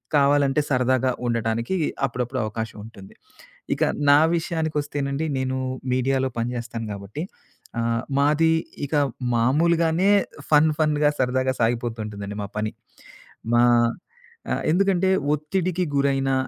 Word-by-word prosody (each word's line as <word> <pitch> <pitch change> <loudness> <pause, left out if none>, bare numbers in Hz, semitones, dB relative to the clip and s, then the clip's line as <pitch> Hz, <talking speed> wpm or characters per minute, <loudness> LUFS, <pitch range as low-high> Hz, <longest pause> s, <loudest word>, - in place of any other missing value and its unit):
కావాలంటే 140 0 +3
సరదాగా 130 -1 +2 0.2
ఉండటానికి 115 +6 -1 0.3
అప్పుడప్పుడు 125 0 -3
అవకాశం 110 0 -5
ఉంటుంది. 100 -4 -13 0.6
ఇక - - -7 0.3
నా 145 +1 +7 0.2
విషయానికొస్తేనండి, 150 -3 -2
నేను 130 0 -1 0.4
మీడియాలో 130 +1 +1
పనిచేస్తాను 115 -1 -4
కాబట్టి 100 +9 -7 0.6
ఆహ్, 115 0 0 0.2
మాది 155 +3 +3 0.3
ఇక 145 - -8 0.4
మామూలుగానే 165 - +3 0.4
ఫన్, 155 +1 +6
ఫన్‌గా 150 -1 +3
సరదాగా 130 +1 +1
సాగిపోతూ 115 0 0
ఉంటుందండి 105 -1 -6
మా - - -5
పని. 110 0 -2 0.8
మా 120 - +5 0.9
ఆహ్, - - -1
ఎందుకంటే, 190 0 +2 0.2
ఒత్తిడికి 180 +4 -1
గురైనా 135 -1 +1
135 Hz, 105 wpm, -23 LUFS, 115-150 Hz, 0.9 s, నా